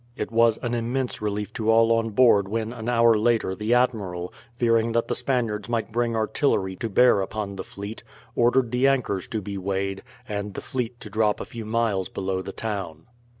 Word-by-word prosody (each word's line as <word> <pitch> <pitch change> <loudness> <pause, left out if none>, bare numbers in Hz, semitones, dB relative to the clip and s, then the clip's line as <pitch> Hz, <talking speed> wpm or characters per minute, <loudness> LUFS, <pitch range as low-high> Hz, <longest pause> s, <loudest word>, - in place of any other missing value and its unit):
It - - -4
was 115 -1 +4
an 120 -1 -1
immense 120 +2 -2
relief 105 0 -3
to 110 -1 -2
all 115 0 +5
on 115 0 +2
board 105 -3 +4
when 110 +2 -2
an 115 -1 -5
hour 115 -1 +5
later 110 -3 +1
the 105 +5 +1
admiral, 100 -8 0 0.2
fearing 115 -1 +2
that 115 0 +1
the - - -1
Spaniards 115 -5 -1
might 115 -1 -1
bring 120 0 0
artillery 110 -4 0
to 115 - -3
bear 120 -1 +5
upon 100 0 -4
the 95 - -5
fleet, 100 +3 -8 0.3
ordered 120 0 +3
the 125 +2 +3
anchors 125 -9 0
to 110 -3 -4
be 100 0 -5
weighed, 95 0 -2 0.3
and 100 -2 -4
the - - -3
fleet 125 -2 -4
to 105 - -8
drop 105 0 +1
a - - -5
few 115 -2 -8
miles 110 -4 0
below 95 -1 -2
the 95 +1 -6
town. 95 -8 -5
110 Hz, 195 wpm, -25 LUFS, 100-120 Hz, 0.3 s, all